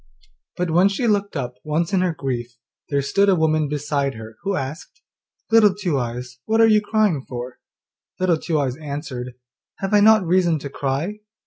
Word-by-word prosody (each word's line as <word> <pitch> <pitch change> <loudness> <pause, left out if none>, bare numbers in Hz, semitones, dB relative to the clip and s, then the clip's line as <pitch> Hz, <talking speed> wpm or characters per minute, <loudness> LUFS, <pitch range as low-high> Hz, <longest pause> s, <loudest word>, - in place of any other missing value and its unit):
But 180 -2 -1
when 180 +4 +5
she 200 +5 -2
looked 205 -5 0
up 125 -2 -4
once 160 +4 -1
in 190 - +3
her 180 -1 +1
grief 120 -4 -4 0.3
there 140 -1 0
stood 200 +8 +2
a 190 - +5
woman 155 -2 +2
beside 145 -1 -1
her 110 0 -10
who 195 0 -1
asked, 145 - -6 0.5
'Little 215 -4 +6
Two 180 -9 -1
eyes, 125 +1 -5
what 225 +1 +1
are 225 - +7
you 215 -1 +5
crying 210 -9 +1
for?' 125 0 -6 0.6
Little 180 -3 +2
Two 160 -1 -1
eyes 130 -3 -1
answered, 140 -5 -6 0.4
'Have 195 +1 -3
I 210 - +6
not 215 -1 +6
reason 175 -1 +2
to 140 -1 -7
cry? 145 +11 -2
160 Hz, 185 wpm, -22 LUFS, 135-195 Hz, 0.6 s, are